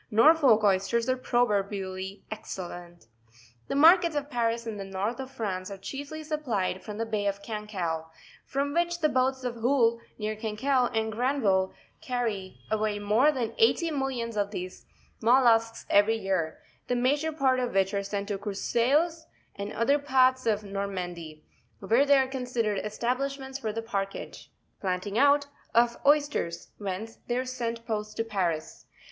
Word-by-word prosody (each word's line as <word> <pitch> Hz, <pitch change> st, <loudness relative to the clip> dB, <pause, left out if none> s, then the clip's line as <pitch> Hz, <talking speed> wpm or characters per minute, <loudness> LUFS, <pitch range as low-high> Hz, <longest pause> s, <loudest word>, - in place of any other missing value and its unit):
Norfolk 240 Hz, -1 st, +5 dB
oysters 205 Hz, +4 st, +2 dB
are 255 Hz, -, +2 dB
pro. 245 Hz, -1 st, +2 dB
verbially 195 Hz, -2 st, -3 dB
excellent. 175 Hz, -, -7 dB, 0.6 s
The -, -, -2 dB
markets 335 Hz, +2 st, +6 dB
of 290 Hz, 0 st, -3 dB
Paris 235 Hz, -1 st, 0 dB
and 220 Hz, -3 st, -5 dB
the -, -, -4 dB
north 195 Hz, +6 st, -3 dB
of 265 Hz, -1 st, -5 dB
France 195 Hz, -7 st, -4 dB
are 200 Hz, -, -7 dB
chiefly 285 Hz, +9 st, -6 dB
supplied 245 Hz, -12 st, -2 dB
from 210 Hz, -1 st, -7 dB
the 230 Hz, -, -1 dB
bay 210 Hz, -2 st, -1 dB
of 200 Hz, 0 st, -2 dB
Cancale; 190 Hz, -7 st, -4 dB, 0.3 s
from 280 Hz, +1 st, -2 dB
which 345 Hz, +1 st, 0 dB
the 305 Hz, -, +4 dB
boats 260 Hz, 0 st, +1 dB
of 240 Hz, -2 st, -3 dB
Houlle, 235 Hz, -1 st, +3 dB, 0.2 s
near 215 Hz, 0 st, -2 dB
Cancale, 240 Hz, +4 st, 0 dB
and 220 Hz, -1 st, -1 dB
Granville, 220 Hz, -6 st, +1 dB, 0.3 s
carry 230 Hz, -, -3 dB
away 215 Hz, -1 st, 0 dB
more 215 Hz, +8 st, +3 dB
than 250 Hz, -6 st, -3 dB
eighty 350 Hz, -7 st, +3 dB
millions 260 Hz, -5 st, -2 dB
of 205 Hz, -1 st, +1 dB
these 185 Hz, -3 st, -7 dB, 0.3 s
mollusks 230 Hz, -1 st, +4 dB
every 210 Hz, +3 st, +4 dB
year, 190 Hz, -6 st, -1 dB, 0.3 s
the 245 Hz, -, 0 dB
major 285 Hz, +6 st, +1 dB
part 265 Hz, -4 st, +2 dB
of 245 Hz, -5 st, -2 dB
which 195 Hz, +1 st, +2 dB
are 200 Hz, -, 0 dB
sent 200 Hz, +1 st, -4 dB
to 200 Hz, -2 st, -2 dB
Courseulles 265 Hz, -, 0 dB, 0.3 s
and 200 Hz, +1 st, -5 dB
other 280 Hz, +6 st, +2 dB
parts 260 Hz, -2 st, +3 dB
of 210 Hz, -1 st, +1 dB
Normandy, 180 Hz, -6 st, -5 dB, 0.3 s
where 230 Hz, +8 st, +2 dB
there 280 Hz, -1 st, +6 dB
are -, -, -4 dB
considerable 245 Hz, -6 st, -2 dB
establishments 265 Hz, +5 st, -2 dB
for 220 Hz, -5 st, -2 dB
the 225 Hz, +1 st, -4 dB
parkage 195 Hz, -3 st, -5 dB, 0.3 s
(planting 195 Hz, +3 st, -1 dB
out) 285 Hz, +1 st, +5 dB, 0.3 s
of 235 Hz, 0 st, +4 dB
oysters, 290 Hz, -, +1 dB
whence 205 Hz, +3 st, -5 dB
they 240 Hz, -, 0 dB
are 255 Hz, -, -1 dB
sent 235 Hz, -2 st, -4 dB
post 215 Hz, -1 st, -4 dB
to 225 Hz, -, +1 dB
Paris. 180 Hz, -8 st, -3 dB
225 Hz, 160 wpm, -28 LUFS, 200-265 Hz, 0.6 s, markets